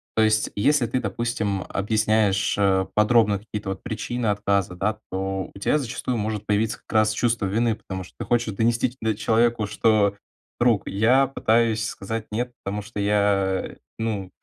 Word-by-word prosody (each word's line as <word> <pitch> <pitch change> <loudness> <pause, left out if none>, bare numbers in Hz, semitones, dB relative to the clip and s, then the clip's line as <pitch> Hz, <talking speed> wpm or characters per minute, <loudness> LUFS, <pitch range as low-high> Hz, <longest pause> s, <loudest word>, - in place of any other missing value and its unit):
То 110 - +4
есть 110 0 +2
если 125 +3 +2
ты, 125 +3 -1
допустим, 105 -2 -2
объясняешь, 105 -1 +1
э, 95 -2 +2
подробно 105 -1 +4
какие-то 105 -2 -6
вот 95 - -5
причины 120 +1 -3
отказа, 100 -3 0
да, 105 +4 -1
то 95 0 -3
у 100 - -11
тя 150 - +2
зачастую 125 -2 -3
может 105 0 -3
появиться 105 +1 0
как - - -17
раз 110 0 +4
чувство 115 -1 0
вины, 110 +3 +1
потому 95 -3 -7
что - - -16
ты - - -5
хочешь 115 -4 0
донести 120 +3 +1
до 110 -2 0
человеку, 115 0 +1
что: 105 -2 +2 0.4
"Друг, 120 -5 +2
я 125 +7 +3
пытаюсь 115 -4 +1
сказать 110 +3 -5
нет, 120 +3 -2
потому 105 +1 -3
что 105 0 -8
я, 100 -2 +1 0.2
ну, 105 -4 -3
110 Hz, 165 wpm, -24 LUFS, 100-115 Hz, 0.4 s, То